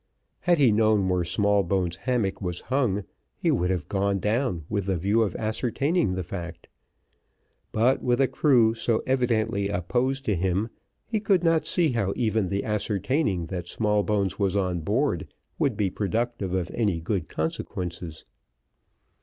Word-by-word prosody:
Had 175 -1 +3
he 135 -6 +5
known 105 -2 +3
where 90 -1 +1
Smallbones' 95 -1 +1
hammock 115 -7 -1
was 90 -2 -3
hung, 120 -7 0 0.3
he - - +1
would 90 +1 +1
have 90 -3 -1
gone 100 0 0
down 105 - -1
with 100 -3 -2
the 95 -2 +1
view 100 +7 +2
of 105 -6 0
ascertaining 120 - 0
the 95 - -2
fact; 85 -2 -7 1.0
but 120 +5 +2
with 120 0 +1
a 135 - +4
crew 120 -8 +4
so 115 0 0
evidently 115 -6 +1
opposed 125 +9 -1
to 105 - +1
him, 95 +5 0 0.4
he 220 - -1
could 195 -4 +2
not 165 -1 +2
see 170 -5 +2
how 105 -5 0
even 110 -5 0
the 100 0 -1
ascertaining 105 - 0
that 90 0 -5
Smallbones 105 -2 0
was 100 -1 +1
on 90 -3 0
board, 115 - -1 0.3
would 140 -9 +1
be 100 -3 +1
productive 110 0 -2
of 90 -2 -1
any 100 -8 0
good 80 - -2
consequences. 85 +1 -4
105 Hz, 155 wpm, -26 LUFS, 95-120 Hz, 1.0 s, he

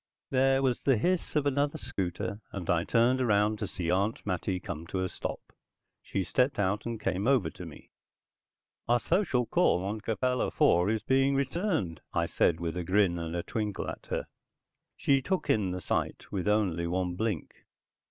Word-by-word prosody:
There 135 +1 +3
was 130 -3 +1
the 135 -4 +3
hiss 180 - 0
of 150 -2 +2
another 145 +1 +1
scooter, 100 -2 -3
and 95 -4 -6
I 85 -1 +2
turned 125 +3 +3
around 105 -2 +2
to 105 - -2
see 85 -2 -2
Aunt 100 +5 0
Mattie 90 -1 -1
come 85 -3 -6
to 95 +1 -2
a - - 0
stop. - - -6 0.5
She 95 - -2
stepped 130 +8 +1
out 105 +3 0
and 115 -2 -3
came 95 +2 -1
over 130 -7 +3
to - - -9
me. - - -13 1.0
"Our 120 +1 +4
social 165 - +1
call 110 - +2
on 105 +2 -3
Capella 125 +4 0
IV 90 +3 +3
is 110 -1 0
being 135 +3 +3
returned," 135 - -1
I - - +2
said 80 -1 +2
with 85 0 -3
a 90 - -2
grin 90 -1 +2
and 85 +1 -3
twinkle 105 -3 -3
at - - -7
her. - - -2 0.7
She 135 -1 +3
took 185 +7 0
in 100 -4 +1
the 90 0 -4
sight - - -2
with 95 -1 -2
only 95 -6 +1
one 90 0 -1
blink. 105 -3 -2
105 Hz, 180 wpm, -29 LUFS, 90-130 Hz, 1.0 s, Our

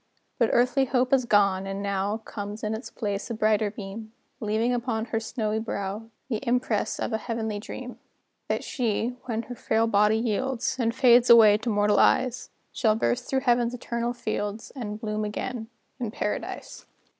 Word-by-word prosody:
But 230 - +4
earthly 250 +3 +3
hope 255 0 +1
is 260 -2 +4
gone; 195 -3 +3
and 195 0 -4
now 200 +1 -1
Comes 210 -1 -7
in 215 +1 -1
its 220 +4 -6
place 205 -1 -3
a 230 - -3
brighter 215 -1 +2
beam, 215 +2 -8 0.3
Leaving 225 +1 0
upon 235 -2 -1
her 225 -1 -1
snowy 220 -1 -2
brow 210 0 -4 0.2
The 235 -5 -1
impress 245 -4 0
of - - -2
a 220 - 0
heavenly 220 -2 -3
dream: 250 +3 -8 0.5
That - - -1
she, 230 -3 -1 0.2
when 230 -2 -2
her 245 - -7
frail 225 -1 +1
body 210 0 +3
yields, 240 +3 -1
And 230 -1 +1
fades 245 -2 +5
away 225 -3 +9
to 220 - -3
mortal 205 -1 +3
eyes, 255 -1 +2 0.2
Shall 220 -3 +2
burst 245 +2 0
through 265 -1 +1
Heaven's 240 -2 +2
eternal 235 0 -2
fields, 215 -2 -4
And 210 -5 -5
bloom 215 -1 -2
again 220 +2 -4 0.3
in 240 -3 -2
Paradise. - - -5
225 Hz, 170 wpm, -26 LUFS, 210-245 Hz, 0.5 s, away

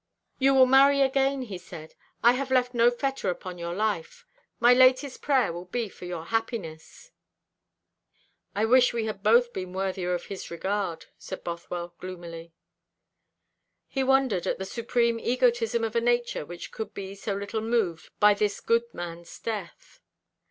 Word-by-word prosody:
'You 270 0 +4
will 260 -1 +8
marry 275 +2 +6
again,' 270 0 +2
he 200 -7 -7
said. 160 -2 -11 0.3
'I 235 - +8
have 265 +1 -3
left 250 -1 +2
no 235 0 +5
fetter 270 0 -2
upon 180 0 -5
your 170 0 -4
life. 210 -5 -2 0.3
My 240 +1 +7
latest 255 +2 +4
prayer 260 - +2
will 175 +1 -7
be 225 +4 -3
for 180 - -11
your 175 -2 -5
happiness.'" 225 - -4 1.4
"I 210 +2 +2
wish 250 +2 +5
we 230 -2 -1
had 215 -3 -5
both 235 +3 +4
been 185 -1 -5
worthier 185 -1 -1
of 175 - -6
his 195 - -7
regard," 190 -1 -3
said - - -8
Bothwell 170 0 -5
gloomily. 170 -2 -8 1.4
He 270 - -1
wondered 265 -8 +2
at - - 0
the 190 - -5
supreme 235 +2 0
egotism 235 -2 +1
of 225 0 -2
a 235 - +3
nature 240 -9 0
which 175 0 -8
could 220 - -6
be 195 -1 -6
so 200 0 -4
little 200 +2 -3
moved 220 -8 -1
by 210 0 +7
this 205 0 -1
good 235 0 +1
man's 170 -1 -7
death. 210 -6 -6
220 Hz, 160 wpm, -27 LUFS, 180-245 Hz, 1.4 s, will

